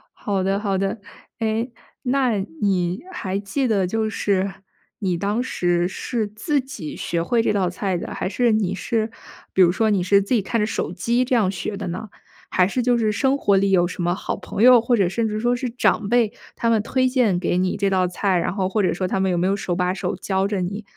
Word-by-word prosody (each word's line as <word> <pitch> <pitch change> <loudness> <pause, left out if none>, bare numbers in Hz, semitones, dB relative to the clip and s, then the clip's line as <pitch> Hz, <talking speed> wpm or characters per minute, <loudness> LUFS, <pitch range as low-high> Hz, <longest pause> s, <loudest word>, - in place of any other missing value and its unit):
好 195 -3 -2
的 195 +1 +1
好 200 -2 -1
的。 195 +3 -1 0.4
诶， 225 +2 -1 0.3
那 255 -4 +1 0.2
你 185 -2 +1
还 190 +1 -3
记 230 +7 -1
得， 195 -5 +1
就 220 +2 -1
是 195 -2 0 0.5
你 185 -4 0
当 205 +6 0
时 175 -8 0
是 220 +3 -3
自 235 +8 -1
己 260 - -7
学 170 -1 -2
会 230 +6 +2
这 - - +1
道 190 -3 +1
菜 185 0 -2
的， - - -6
还 - - -3
是 240 +3 +2
你 205 -3 +1
是 220 +3 -1 0.4
比 190 - +3
如 175 - +6
说 220 +4 +1
你 200 -4 +2
是 200 +2 +4
自 200 +6 -2
己 220 - +2
看 230 +4 -1
着 - - +2
手 215 - -2
机 235 +8 +1
这 250 0 +1
样 205 -5 +3
学 200 +2 -4
的 195 -2 -5
呢？ 185 +5 -5 0.4
还 180 - +4
是 250 +6 -1
就 245 0 +2
是 215 -2 +1
生 265 +6 +2
活 200 -7 +2
里 195 0 +2
有 175 -2 +4
什 180 - -5
么 175 0 +1
好 185 - -3
朋 200 - -5
友， 250 -1 +8
或 240 0 +2
者 195 - +3
甚 225 +5 -1
至 215 0 -2
说 240 +2 +1
是 245 +1 -3
长 220 -3 +1
辈， 235 -3 +2 0.2
他 230 - +1
们 220 -2 +2
推 255 +3 +1
荐 245 -8 +2
给 175 0 0
你 185 +1 0
这 200 -1 +1
道 185 -1 +2
菜？ 185 +1 0
然 170 - -1
后 190 -2 0
或 205 +2 0
者 185 - +2
说 185 +2 -2
他 190 +1 -1
们 190 -1 +1
有 175 - 0
没 180 +2 +1
有 195 - +2
手 190 -3 -3
把 180 +1 0
手 190 - -3
教 190 -1 0
着 200 -2 -2
你 200 +4 -4
200 Hz, 260 characters per minute, -22 LUFS, 185-230 Hz, 0.5 s, 友